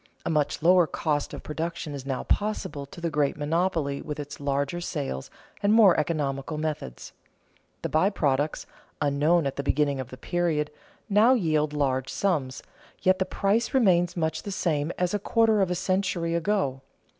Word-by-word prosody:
A - - 0
much 150 -1 0
lower 180 0 +6
cost 150 -2 -1
of - - -8
production 160 0 -4
is 135 -1 -7
now 135 -2 -2
possible 190 -9 -2
to 155 - -12
the 170 -1 -2
great 145 -1 +1
monopoly 155 -2 0
with 150 0 -6
its 145 0 -7
larger 140 +4 -1
sales 140 - -4 0.3
and 205 - +3
more 215 -5 +7
economical 150 -1 -1
methods. 150 - -5 0.7
The - - -1
by 160 +5 +3
products, 145 -5 0 0.3
unknown 150 +3 +2
at 135 - -3
the - - 0
beginning 145 -1 +1
of 130 -1 -5
the 130 - -9
period, 155 0 -1 0.4
now 215 +4 +5
yield 155 - +1
large 135 -3 0
sums, 150 -10 -1 0.4
yet 185 0 +4
the 190 - +1
price 210 +6 0
remains 180 -7 +3
much 160 -1 -1
the - - -7
same 160 -5 -1
as 180 +1 0
a 205 - +1
quarter 220 0 +3
of 190 - +2
a 180 - 0
century 185 -2 0
ago. 170 -7 0
160 Hz, 170 wpm, -26 LUFS, 145-185 Hz, 0.7 s, more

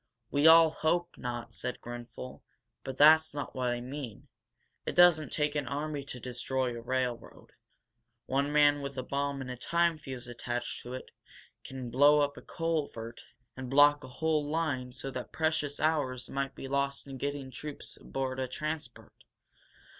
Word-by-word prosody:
"We 145 +2 +4
all 165 0 +9
hope 175 +3 0
not," 120 -1 -5
said 125 - -4
Grenfel. 120 +1 -8 0.4
"But 135 0 -6
that's 155 +1 +7
not 145 -2 -4
what 125 -1 0
I 120 0 -1
mean. 130 -4 -7 0.5
It - - -4
doesn't 175 -3 +6
take 150 -1 0
an 145 -3 -2
army 145 +2 -3
to 130 - -7
destroy 125 +1 -2
a 115 - -6
railroad. 125 0 -3 0.7
One 140 +2 0
man 145 -1 +5
with 140 -1 -6
a 130 - -2
bomb 140 0 -2
and 130 -1 -5
a - - -4
time 170 +5 +1
fuse 130 -4 -7
attached 120 0 -4
to 125 +1 -6
it 130 - -9 0.5
can 130 -2 -7
blow 145 +3 +6
up 145 0 0
a - - -10
culvert 145 -9 -3 0.3
and 130 -1 -6
block 145 +2 +6
a - - -8
whole 150 +2 0
line 145 -6 -1
so 135 +2 -5
that 130 -1 -6
precious 155 -3 0
hours 135 -6 0
might 135 0 -2
be 135 - -7
lost 140 0 -1
in 135 -2 -8
getting 140 -1 -3
troops 150 +3 -7
aboard 130 -1 -4
a 130 - -1
transport. 150 -1 -5
140 Hz, 170 wpm, -31 LUFS, 125-150 Hz, 0.7 s, all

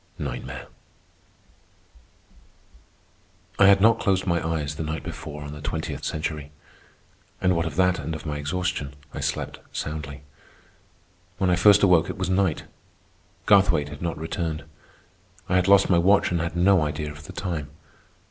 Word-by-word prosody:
NIGHTMARE 65 -1 -5 2.9
I 100 - +7
had 100 0 +7
not 115 +2 +5
closed 95 -2 +1
my 85 -3 0
eyes 80 -3 -2
the 75 - -6
night 80 +1 -4
before 75 -1 -7
on 75 0 -7
the 75 - -9
Twentieth 75 -1 -4
Century, 75 -2 -4 0.9
and 90 -1 +2
what 85 0 0
of 75 - -6
that 90 0 +2
and 80 +2 -4
of 80 - -8
my 75 -2 -3
exhaustion 75 -2 -3 0.2
I - - -5
slept - - -3
soundly. 75 -2 -5 1.1
When 95 -2 +1
I - - +4
first 100 +2 +6
awoke, 90 -4 +4
it - - -5
was 95 0 -2
night. 95 -6 +1 0.8
Garthwaite 90 -8 +4
had 75 -1 -10
not 85 -2 -2
returned. 80 0 -3 0.8
I 90 - +2
had 90 0 +2
lost 100 0 +6
my 85 -3 +4
watch 95 +3 +4
and 85 -2 0
had 85 0 -3
no 90 +1 +4
idea 75 0 -2
of 75 0 -12
the - - -10
time. 85 -7 -4
80 Hz, 155 wpm, -25 LUFS, 75-90 Hz, 2.9 s, I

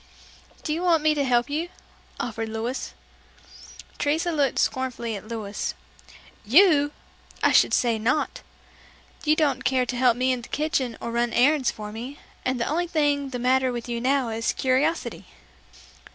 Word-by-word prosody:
"Do 305 - -1
you 330 - -2
want 335 -4 +3
me 310 0 +4
to 290 -2 0
help 245 -2 +2
you?" 315 +4 -2 0.5
offered 225 -2 -3
Louis. 225 +4 -4 1.0
Teresa 320 +4 +1
looked 285 -5 +1
scornfully 250 -3 -1
at 205 +1 -9
Louis 215 -3 -4 0.7
"You! 290 - +5 0.5
I - - +5
should - - +5
say 235 -3 +2
not! 255 +7 0 0.8
You 305 +1 +4
don't 280 -5 +1
care 260 -1 +2
to 250 - -4
help 245 -1 +3
me 255 +1 +2
in 250 -1 -1
the - - -12
kitchen 280 -6 -1
or 235 - -5
run 235 0 0
errands 270 +1 +3
for 210 -1 -6
me, 245 +6 -7 0.3
and 255 -1 -1
the 235 - 0
only 345 +4 0
thing 290 -4 +1
the 255 - -4
matter 255 +1 +2
with 240 -1 -5
you 235 -1 -3
now 265 -1 +1
is 225 +1 -1
curiosity!" 270 +6 0
260 Hz, 165 wpm, -25 LUFS, 235-295 Hz, 1.0 s, You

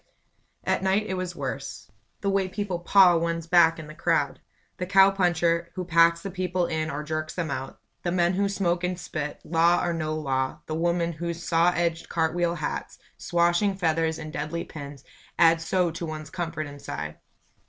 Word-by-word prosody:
At - - 0
night 190 +3 +2
it 190 - -3
was 185 -1 -3
worse. 140 -4 -6 0.3
The 200 - 0
way 195 -1 +1
people 195 -3 -3
paw 180 0 +6
one's 165 0 -1
back 165 -1 +5
in 160 - -8
the 155 - -10
crowd! - - 0 0.4
The 180 - -3
cow 195 0 +6
puncher 170 -3 +1
who 185 -1 -3
packs 170 0 +4
the 195 - -4
people 180 -1 -1
in 160 -1 -2
or 150 +1 -4
jerks 155 0 -4
them 165 -4 -2
out 135 -1 -5 0.2
the 175 - -1
men 175 0 +2
who 200 +2 +1
smoke 180 -3 0
and 180 0 -1
spit, 150 -4 -5
law 170 +2 +3
or 175 - 0
no 155 -1 -2
law 130 -3 -2
the 155 - -5
women 170 +1 0
whose 170 +1 -5
saw 170 +1 +3
edged 170 0 -1
cart 160 -1 0
wheel 175 -1 0
hats, - - -4 0.2
swashing 175 +3 +2
feathers 160 -3 0
and 155 -1 -8
deadly 155 +3 -3
pins, 140 -3 -9 0.3
add 165 -1 +5
so 175 +1 +1
to 165 - -7
one's 155 -1 -7
comfort 165 -4 -3
inside. 75 - -7
170 Hz, 185 wpm, -26 LUFS, 155-180 Hz, 0.4 s, paw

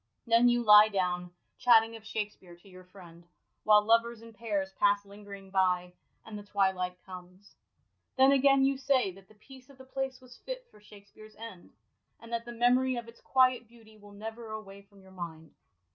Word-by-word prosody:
Then 235 +1 +4
you 240 0 +1
lie 210 -1 +8
down, 180 -3 -2 0.3
chatting 225 -1 +4
of 225 - -12
Shakspere 210 -5 -6
to 175 +3 -22
your 185 -1 -14
friend, 175 -2 -16 0.4
while 210 -1 +5
lovers 230 0 +1
in 230 0 -14
pairs 200 -4 -4
pass 205 0 +2
lingering 200 -1 -12
by, 180 -2 0 0.3
and 220 - -10
the 205 - -7
twilight 190 -3 -1
comes. 185 +1 -13 0.6
Then 265 +1 +6
again 275 0 +4
you 270 0 0
say 265 -7 +1
that 190 +1 -18
the 215 - -21
peace 260 +4 -17
of 275 - -17
the 260 - -14
place 265 0 -5
was 250 -1 -16
fit - - -8
for 210 - -20
Shakspere's 210 +1 -17
end, 220 -6 -12 0.5
and 230 0 -12
that 230 0 -3
the 240 - -8
memory 250 +2 +2
of 235 -1 -6
its 230 - -16
quiet 255 -2 +2
beauty 225 -1 -19
will 205 -1 -17
never 225 +2 -9
away 200 -2 -9
from 200 -1 -22
your 190 - -18
mind. 165 -3 -9
215 Hz, 190 wpm, -29 LUFS, 195-240 Hz, 0.6 s, lie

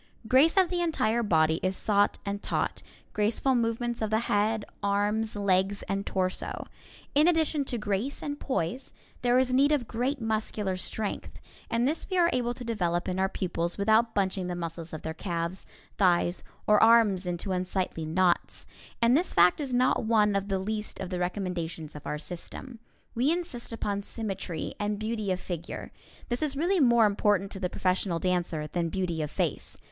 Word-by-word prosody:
Grace 280 - +5
of 375 -2 +4
the 350 -1 0
entire 235 -9 +1
body 160 -6 +3
is 185 0 -1
sought 205 -1 +2
and 200 0 -3
taught, - - -2 0.3
graceful 220 +5 +1
movements 235 0 0
of 220 - 0
the 220 +1 +2
head, 215 -1 +1 0.2
arms, 205 +2 0
legs 200 0 +1
and 195 0 -3
torso. 185 -1 -2 0.5
In 300 +3 +5
addition 320 -4 +2
to 245 - -2
grace 210 +5 -2
and 290 0 -4
poise, 255 0 -3 0.3
there 245 0 +3
is 255 0 +3
need 280 +3 +4
of 275 -6 +1
great 255 +5 -1
muscular 215 -3 -1
strength, 205 +3 -4 0.3
and 235 +2 +2
this 310 +7 -1
we 370 - 0
are 345 -1 +4
able 240 -1 0
to 250 - -7
develop 180 -7 -1
in 185 0 -1
our 190 0 +2
pupils 170 -3 -2
without 220 +3 +3
bunching 190 -2 0
the 180 - -3
muscles 165 -1 -5
of 155 - -7
their 160 - -3
calves, 170 +1 -3 0.3
thighs 175 -2 +3 0.2
or 210 0 +5
arms 220 -5 +5
into 175 +2 -3
unsightly 185 -2 -2
knots. 175 +3 +1 0.4
And 235 +2 +5
this 345 +5 +1
fact 180 - +5
is 275 -3 -4
not 250 0 +2
one 210 -2 +3
of 200 0 0
the 195 -1 0
least 210 +2 -4
of 190 -1 -5
the 180 - -2
recommendations 175 -4 -3
of 150 - -8
our 150 - -2
system. 185 - -8 0.3
We 255 +6 +2
insist 335 -10 -4
upon 205 -3 -2
symmetry 195 -6 -4
and 205 0 -1
beauty 215 -2 -2
of 185 - -1
figure. 175 -3 -6 0.4
This 240 0 -1
is 285 -3 -1
really 355 +5 +2
more 235 -5 +5
important 200 -1 +2
to 195 - -6
the 180 -2 -1
professional 185 -1 0
dancer 175 -3 -1
than 170 +2 -2
beauty 175 -3 -2
of 150 - -2
face. - - -2
205 Hz, 180 wpm, -28 LUFS, 180-235 Hz, 0.5 s, Grace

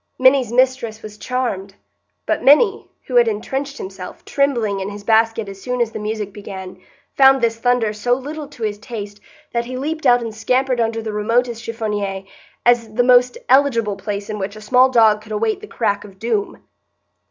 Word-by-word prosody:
Minny's 260 -2 +4
mistress 245 -3 +1
was 215 -1 -9
charmed; 205 -7 -3 0.5
but - - 0
Minny, 385 - +4 0.2
who 250 - 0
had 240 -1 +6
intrenched 270 +6 -3
himself, 190 -1 -9
trembling, 235 -8 0
in 190 +1 -4
his 205 0 -9
basket 225 0 +2
as 195 0 -9
soon 250 +2 -3
as 235 -2 +1
the - - -6
music 210 -1 -4
began, 190 -2 -8 0.4
found 270 0 +6
this 230 -1 0
thunder 245 -3 +1
so 215 +4 0
little 290 +4 -4
to 245 -5 -10
his 210 -1 -2
taste 210 -3 -7 0.3
that 235 0 0
he 255 +1 -6
leaped 305 +2 -2
out 245 -1 +5
and 225 -1 -5
scampered 250 +3 0
under 225 0 -1
the 220 -1 -4
remotest 230 +2 0
chiffonnier, 210 -4 -3 0.4
as 230 -3 +2
the 245 - +3
most 250 0 +4
eligible 250 -6 +3
place 200 +1 -5
in 215 -1 -5
which 200 +2 -4
a 215 - -10
small 250 +4 +4
dog 220 -4 +4
could 215 0 -14
await 395 - -1
the 425 - -9
crack 205 - -1
of 195 -2 -14
doom. 220 -1 -2
230 Hz, 185 wpm, -19 LUFS, 210-250 Hz, 0.5 s, had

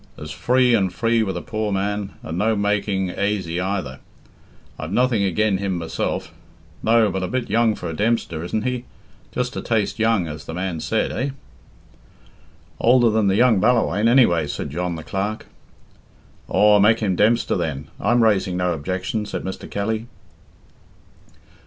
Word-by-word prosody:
"As 75 0 -8
free 125 +7 +2
and 95 -5 +2
free 115 +4 +1
with 100 -3 -2
a - - -6
poor 110 -3 -3
man, 100 +1 -2
and 80 - -5
no 110 +5 +1
making 100 -2 0
aisy 95 -4 -1
either. 90 -9 -3 0.8
I've 80 +2 -5
nothing 125 -1 +2
agen 100 +1 +1
him 100 -2 -2
myself. 85 -1 -3 0.5
No, 115 -2 +3
but 95 - -2
a 90 - -1
bit 125 +1 -3
young 115 -1 +3
for 90 - -6
a 80 - -4
Dempster, 100 -4 -1
isn't 105 +5 -2
he? 125 0 -2 0.5
Just 125 0 -2
a - - -3
taste 110 -1 -1
young, 110 -6 +2
as 75 0 -7
the 80 - -6
man 90 -2 -3
said, - - -1
eh?" 135 +3 -2 1.5
"Older 120 -1 +4
than 110 -1 +2
the 95 - +3
young 115 -2 +4
Ballawhaine, 110 -1 +2
anyway," 100 - +4
said 70 0 -4
John, 90 +2 -2
the 80 - -7
clerk. 100 +5 -3 1.0
"Aw, 105 0 +5
make 110 +3 +4
him 100 -4 0
Dempster, 115 +5 +2
then. 80 -7 -3
I'm 120 -1 +3
raising 95 -4 +2
no 90 -1 +1
objection," 95 +7 -3
said - - -4
Mr. 95 - -6
Kelly. 110 +3 -2
100 Hz, 165 wpm, -22 LUFS, 90-115 Hz, 1.5 s, Aw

